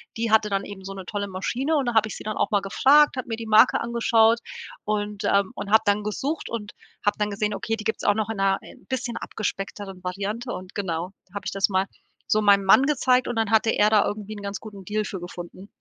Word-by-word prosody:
die 225 -1 -1
hatte 220 -1 +4
dann 195 -1 0
eben 195 -2 -9
so 195 - -6
'ne 190 -1 -8
tolle 200 +2 -3
Maschine 245 +11 -1
und 275 -4 +1
da 240 - 0
hab 220 -1 +4
ich 215 - -6
sie - - -9
dann 215 0 -4
auch - - 0
mal 205 -2 +3
gefragt, 275 +9 +4
hab 255 - -3
mir 225 - -2
die 225 0 -7
Marke 220 +3 +5
angeschaut 230 -1 +3 0.5
und 210 -1 -2
ähm, 200 -1 +2
und 200 - -6
hab 220 - +6
dann 205 +1 +1
gesucht 275 +9 -3
und 210 -3 -5 0.3
hab 205 - +3
dann 210 -1 -1
gesehen, 210 0 -1
okay, 225 +2 -2
die 215 - -8
gibt's 220 +1 -2
auch 205 - +5
noch 220 0 -1
in 225 - -3
'ner 195 0 +2
i - - -13
bisschen 245 -2 -3
abgespeckteren 195 -2 -5
Variante 205 +7 -3
und 185 0 -8
genau, 175 -2 -3
da 190 - -30
hab 205 -1 -5
ich - - -2
das 195 0 +2
mal 190 -1 +1 0.4
so 215 - +3
meinem 200 -1 +5
Mann 225 +7 +7
gezeigt 255 -3 +2
und 240 - -2
dann 225 -2 0
hatte 225 0 +4
er 210 - +3
da 215 -2 +4
irgendwie 210 0 -4
'n - - -8
ganz 200 0 -5
guten 200 -3 -10
Deal 215 +2 -1
für 195 -2 -5
gefunden. 175 +2 -9
210 Hz, 250 wpm, -24 LUFS, 195-225 Hz, 0.5 s, Mann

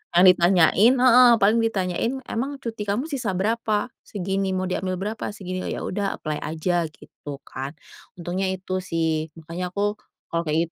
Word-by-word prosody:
yang 175 - +7
ditanyain 180 +5 +5
heeh, 250 -1 +7
paling 220 +1 +3
ditanyain, 210 -1 0
"Emang 265 +4 -3
cuti 225 -3 -5
kamu 245 +11 -1
sisa 235 -9 -2
berapa?" 215 +2 0
"Segini," 195 -1 -2
"Mau 185 - -1
diambil 185 0 -2
berapa?" 210 +4 -4
"Segini," 185 -2 -5
"Oh, - - -3
ya - - -5
udah 200 +1 -2
apply 155 -1 -2
aja," 165 +2 -1
gitu 145 -1 -10
kan, 135 +4 -6 0.4
untungnya 180 +2 -2
itu 185 0 -2
sih. 160 -3 -1
Makanya 170 +3 -6
aku 205 +1 0 0.3
kalau 170 -1 -1
kayak 160 +2 +1
185 Hz, 160 wpm, -24 LUFS, 170-215 Hz, 0.4 s, yang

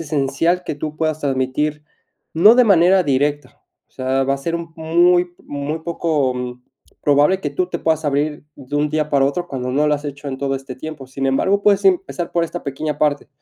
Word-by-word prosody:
esencial 155 +4 0
que - - -3
tú 155 +1 -5
puedas 155 -1 -1
transmitir, 145 +2 -1 0.5
no 205 +8 +7
de 250 0 +5
manera 190 -2 +5
directa, 145 +1 -1 0.3
o - - -39
sea, 130 +1 0
va 135 +1 +1
a - - -6
ser 165 +5 -3
un 170 -1 -8
muy 175 +2 +3
muy 145 +3 -4
poco 130 -7 -2 0.4
probable 145 +6 +3
que - - -3
tú 185 - -1
te - - -4
puedas 160 -1 0
abrir 145 +1 -1
de 140 +1 -5
un 150 0 +1
día 155 0 0
para 140 -2 +3
otro 175 +6 -2
cuando 125 -2 -4
no 150 +3 +1
lo 150 - +3
has 145 - -6
hecho 140 0 -6
en 130 - -4
todo 135 0 -1
este 135 -1 -6
tiempo, 155 -1 -8
sin 135 +1 -5
embargo, 190 +10 +1
puedes 200 -1 +3
empezar 185 -2 0
por 170 -1 +1
esta 175 +1 -6
pequeña 145 +2 -3
parte, 145 -1 0
150 Hz, 205 wpm, -19 LUFS, 140-170 Hz, 0.5 s, no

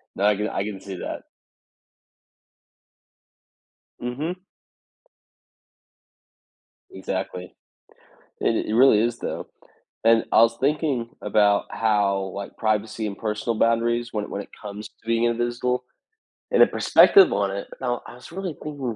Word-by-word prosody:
No, 100 - 0
I 105 0 +4
can 105 +2 -2
I - - -2
can 100 -2 -6
see 95 -1 -7
that. - - -5 2.8
Mhm. 145 +9 -4 2.5
Exactly. 95 -1 -5 0.9
It 115 - +1
it 110 - -2
really 120 -3 +6
is 120 +1 0
though, - - -5 0.6
and 115 0 +5
I - - +7
was 115 0 +3
thinking 140 -4 0
about 105 0 +3
how, 100 -3 +1
like, 100 0 -7
privacy 110 0 -1
and 100 -1 -5
personal 110 +1 -2
boundaries 120 +1 +1
when 105 -2 -2
it - - -10
when 100 - -4
it - - -17
comes 105 0 -7
to - - -38
being 115 0 +1
invisible, 120 +1 0 0.7
and - - +4
a - - +5
perspective 395 -2 +6
on 100 -1 0
it, 100 +1 -5
I 120 -2 0
I - - -11
was 125 - -14
really 185 -1 -4
thinking 140 -6 -4
115 Hz, 135 wpm, -24 LUFS, 105-120 Hz, 2.8 s, I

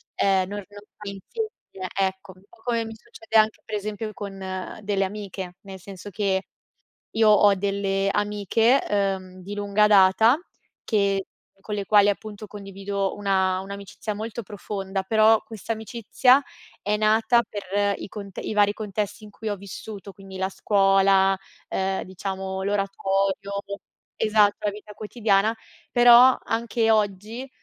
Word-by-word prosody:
ehm, 190 -2 +2
non 205 +1 -5
normalizzi 205 - -7 0.2
che 185 -1 -6
ecco. 190 0 -1
Un 185 - -21
po' - - -21
come 230 -2 0
mi 225 - -7
succede 225 0 -3
anche 220 0 +3
per 215 - -4
esempio 215 +1 -4
con 200 -1 -7 0.5
delle 200 -1 +1
amiche, 190 -2 -6
nel 195 -1 -10
senso 195 +2 -10
che 190 -1 0 0.7
io 220 -1 +5
ho 205 -1 +6
delle 195 0 0
amiche, 210 +5 +2
uhm, 190 -2 -1
di 200 +3 -7
lunga 205 +1 +2
data, 210 +5 +6 0.5
che 200 -3 +1 0.3
con 210 - -6
le 200 -1 -3
quali 205 -1 +5
appunto 215 0 -5
condivido 195 -1 -4
una 190 -2 +1
un'amicizia 200 +2 -6
molto 225 +2 -5
profonda, 195 -1 -4
però 220 +2 +4
questa 220 0 -7
amicizia 230 +5 +2 0.4
è 210 +1 0
nata 220 +2 +4
per 200 0 -1
i - - -7
cont 200 -3 -9
i - - -3
vari 205 -1 +4
contesti 210 0 -4
in 210 - -10
cui 220 +2 -8
ho 205 - 0
vissuto, 200 +1 -9
quindi 195 0 -12
la 190 0 -1
scuola, 195 -1 +3 0.3
ehm, 190 0 -1
diciamo, 190 0 -5
l'oratorio 195 0 -1 0.7
esatto, 210 -2 +4
la 210 -1 -1
vita 210 0 -11
quotidiana, 215 0 +1 0.4
però 245 +1 +7
anche 230 0 0
oggi, 215 +4 -1
205 Hz, 140 wpm, -24 LUFS, 195-215 Hz, 0.7 s, però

